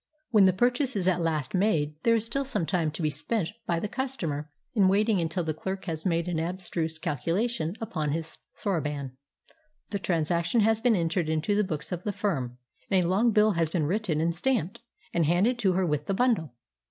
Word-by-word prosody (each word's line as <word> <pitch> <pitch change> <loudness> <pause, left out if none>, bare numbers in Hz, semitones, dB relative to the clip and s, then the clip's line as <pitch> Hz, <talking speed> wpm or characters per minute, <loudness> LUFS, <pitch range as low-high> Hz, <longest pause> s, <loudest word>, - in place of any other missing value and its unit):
When 210 -4 +6
the 190 - +6
purchase 245 +6 +1
is 185 -3 0
at 180 -2 +2
last 155 -5 -1
made, 165 -7 +2
there 230 +4 +4
is 225 -1 +1
still 275 +5 -1
some 265 -11 -1
time 165 -3 0
to 165 - -4
be 155 - +2
spent 210 +1 -2 0.2
by 170 -1 +1
the 210 - -2
customer 195 - -3 0.2
in 200 -5 +4
waiting 205 0 +3
until 170 +2 -1
the 160 -1 -1
clerk 190 +5 -5
has 165 0 -3
made 170 -1 0
an 175 -3 -1
abstruse 165 -2 -2
calculation 170 - -1
upon 155 -9 -2
his 160 +1 -2 0.2
soroban, 150 -8 -2 0.8
the 200 - -1
transaction 170 +4 +1
has 220 +1 +3
been 240 -2 +4
entered 170 -2 0
in 160 0 +1
the 205 +6 +1
books 155 -5 -4
of 180 0 -3
the 210 - -1
firm, 135 - -2 0.3
and 190 -2 +3
a - - 0
long 200 +7 +3
bill 215 0 +4
has 165 -4 +1
been 160 -2 0
written 180 -2 0
and 165 +1 +1
stamped, 225 +1 -1 0.3
and 165 -3 +2
handed 200 +9 +2
to 195 -5 +3
her 185 +1 +1
with 150 -2 -1
the 195 - 0
bundle. 195 - +1
180 Hz, 205 wpm, -28 LUFS, 160-210 Hz, 0.8 s, When